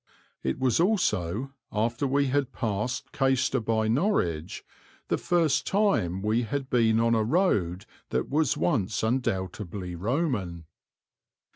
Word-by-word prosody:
It 65 Hz, -, -1 dB
was 130 Hz, 0 st, +1 dB
also, 135 Hz, -, 0 dB, 0.2 s
after 115 Hz, +6 st, 0 dB
we 140 Hz, +1 st, +2 dB
had 135 Hz, 0 st, 0 dB
passed 120 Hz, +2 st, -3 dB
Caistor 135 Hz, -2 st, +1 dB
by 110 Hz, -1 st, 0 dB
Norwich, 110 Hz, -, 0 dB, 0.4 s
the -, -, +2 dB
first 165 Hz, -5 st, +1 dB
time 145 Hz, -, +1 dB
we 110 Hz, +3 st, +2 dB
had 135 Hz, +3 st, -4 dB
been 115 Hz, -2 st, +3 dB
on 115 Hz, 0 st, +3 dB
a 110 Hz, -1 st, +2 dB
road 105 Hz, -, +1 dB, 0.2 s
that -, -, -1 dB
was 150 Hz, -1 st, +1 dB
once 95 Hz, +6 st, 0 dB
undoubtedly 100 Hz, -6 st, -2 dB
Roman. 100 Hz, -, -2 dB
115 Hz, 125 wpm, -27 LUFS, 95-135 Hz, 0.4 s, been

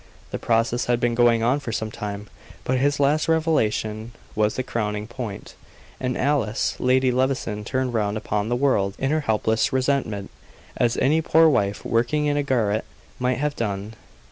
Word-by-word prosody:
The -, -, -3 dB
process 115 Hz, +1 st, +1 dB
had 120 Hz, -1 st, +1 dB
been 120 Hz, 0 st, +1 dB
going 115 Hz, -1 st, +3 dB
on 125 Hz, +5 st, +2 dB
for 120 Hz, -, -5 dB
some 110 Hz, -1 st, -3 dB
time, 105 Hz, -1 st, -6 dB, 0.4 s
but 130 Hz, 0 st, 0 dB
this 140 Hz, +1 st, +1 dB
last 145 Hz, +2 st, +2 dB
revelation 115 Hz, -9 st, 0 dB, 0.2 s
was 105 Hz, 0 st, +1 dB
the 130 Hz, -, -1 dB
crowning 105 Hz, -4 st, -2 dB
point; 120 Hz, -3 st, -7 dB, 0.5 s
and 125 Hz, -1 st, -2 dB
Alice, 125 Hz, -6 st, 0 dB
Lady 130 Hz, 0 st, +3 dB
Levison, 125 Hz, -5 st, -1 dB
turned 130 Hz, +2 st, -2 dB
round 105 Hz, -2 st, 0 dB
upon 105 Hz, 0 st, -2 dB
the 120 Hz, -, +1 dB
world 115 Hz, -7 st, +1 dB
in 135 Hz, +1 st, -1 dB
her 155 Hz, -, +2 dB
helpless 110 Hz, -4 st, +1 dB
resentment, 130 Hz, -7 st, -1 dB, 0.4 s
as 120 Hz, -2 st, +1 dB
any 155 Hz, +5 st, +3 dB
poor 160 Hz, +1 st, +5 dB
wife, 100 Hz, -9 st, +1 dB
working 120 Hz, +6 st, +1 dB
in 145 Hz, 0 st, +1 dB
a 145 Hz, -, +2 dB
garret, 115 Hz, -6 st, 0 dB, 0.4 s
might 125 Hz, 0 st, +1 dB
have 150 Hz, +1 st, -1 dB
done. 105 Hz, -1 st, -3 dB
120 Hz, 170 wpm, -23 LUFS, 110-135 Hz, 0.5 s, poor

